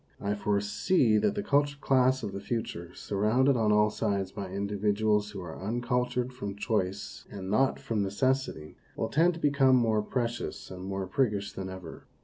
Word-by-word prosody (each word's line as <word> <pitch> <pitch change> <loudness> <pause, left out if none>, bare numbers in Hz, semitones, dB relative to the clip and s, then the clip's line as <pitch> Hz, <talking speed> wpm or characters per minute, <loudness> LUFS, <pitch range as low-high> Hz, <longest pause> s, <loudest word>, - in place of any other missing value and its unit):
I 100 +1 -1
foresee 105 - +2
that 205 - +1
the 205 - -2
cultured 145 -2 +1
class 130 -1 +3
of 100 - -3
the 100 - -5
future, 100 -6 -4
surrounded 115 +7 +2
on 110 -3 +2
all 105 0 +4
sides 100 -3 -1
by 100 -2 -6
individuals 105 +2 0
who 100 -2 -7
are 80 -3 -7
uncultured 125 +3 -1
from 100 -6 -5
choice 100 -2 -2
and 95 -2 -6
not 130 +5 +2
from 110 -3 -1
necessity, 105 - -1 0.2
will 110 - -2
tend 165 +7 +3
to - - -8
become 140 -3 +4
more 110 -3 +3
precious 120 0 -3
and 90 0 -7
more 95 0 -3
priggish 100 -1 0
than 95 -1 -5
ever. 95 -3 -9
105 Hz, 170 wpm, -29 LUFS, 100-125 Hz, 0.2 s, all